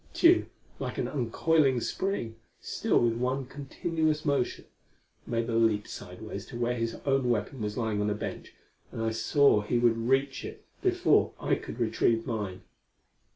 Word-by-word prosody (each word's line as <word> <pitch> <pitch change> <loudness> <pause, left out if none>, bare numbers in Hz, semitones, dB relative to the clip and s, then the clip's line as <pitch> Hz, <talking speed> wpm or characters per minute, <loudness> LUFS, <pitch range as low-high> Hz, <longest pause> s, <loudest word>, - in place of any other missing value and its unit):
Tugh, 350 +1 +5 0.3
like - - -4
an - - 0
uncoiling 135 +1 +2
spring, 120 - -2 0.2
still - - +1
with 115 -1 +2
one 130 +2 -1
continuous 155 +3 -2
motion, 140 -4 0 0.6
made 115 0 -1
a 115 - -2
leap 110 -2 +2
sidewise 100 +1 -7
to 120 - -7
where 120 +1 0
his 115 -1 -2
own 135 -2 +2
weapon 120 +2 -1
was 105 0 -3
lying 110 -3 0
on 105 - +1
a 105 - 0
bench, 105 - -6 0.4
and - - -7
I 115 0 0
saw 115 +1 +4
he 105 +4 0
would 115 0 +2
reach 135 +1 +1
it - - -8 0.2
before - - +3
I - - 0
could 115 - -4
retrieve 115 0 +1
mine. 105 -6 -4
120 Hz, 160 wpm, -29 LUFS, 110-135 Hz, 0.6 s, Tugh